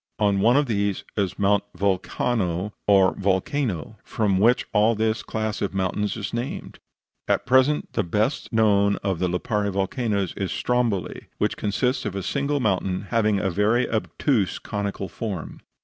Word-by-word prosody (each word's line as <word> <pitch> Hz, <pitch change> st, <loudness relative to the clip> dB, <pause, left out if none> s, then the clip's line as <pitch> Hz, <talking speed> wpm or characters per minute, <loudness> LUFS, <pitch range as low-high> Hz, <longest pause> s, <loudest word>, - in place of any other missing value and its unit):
On 100 Hz, -2 st, +2 dB
one 120 Hz, +6 st, +4 dB
of 145 Hz, -, +3 dB
these 100 Hz, -5 st, -1 dB
is 100 Hz, -4 st, -1 dB
Mount 100 Hz, 0 st, +2 dB
Vulcano, 100 Hz, 0 st, -1 dB
or 95 Hz, -2 st, +5 dB
Volcano, 100 Hz, -, -1 dB
from 100 Hz, -4 st, 0 dB
which 120 Hz, +5 st, +4 dB
all 110 Hz, +2 st, +4 dB
this 110 Hz, 0 st, 0 dB
class 110 Hz, -1 st, -3 dB
of 100 Hz, -1 st, -2 dB
mountains 100 Hz, +3 st, -1 dB
is 100 Hz, -2 st, -5 dB
named. 120 Hz, +3 st, -5 dB, 0.5 s
At -, -, +1 dB
present 130 Hz, +3 st, +3 dB
the 115 Hz, -, +1 dB
best 105 Hz, -, -1 dB
known 100 Hz, -3 st, +3 dB
of 95 Hz, -4 st, -1 dB
the 90 Hz, -, +1 dB
Lipari 100 Hz, +3 st, -1 dB
volcanoes 100 Hz, 0 st, -1 dB
is 95 Hz, -2 st, -3 dB
Stromboli, 115 Hz, -9 st, -1 dB
which -, -, 0 dB
consists 125 Hz, +6 st, 0 dB
of 100 Hz, -2 st, -3 dB
a 95 Hz, -, -3 dB
single 140 Hz, +1 st, -1 dB
mountain, 95 Hz, -5 st, 0 dB
having 110 Hz, -3 st, +2 dB
a 95 Hz, -1 st, 0 dB
very 105 Hz, +7 st, +2 dB
obtuse 110 Hz, -1 st, 0 dB
conical 100 Hz, -1 st, -4 dB
form. 95 Hz, -1 st, -6 dB
105 Hz, 155 wpm, -24 LUFS, 95-115 Hz, 0.5 s, or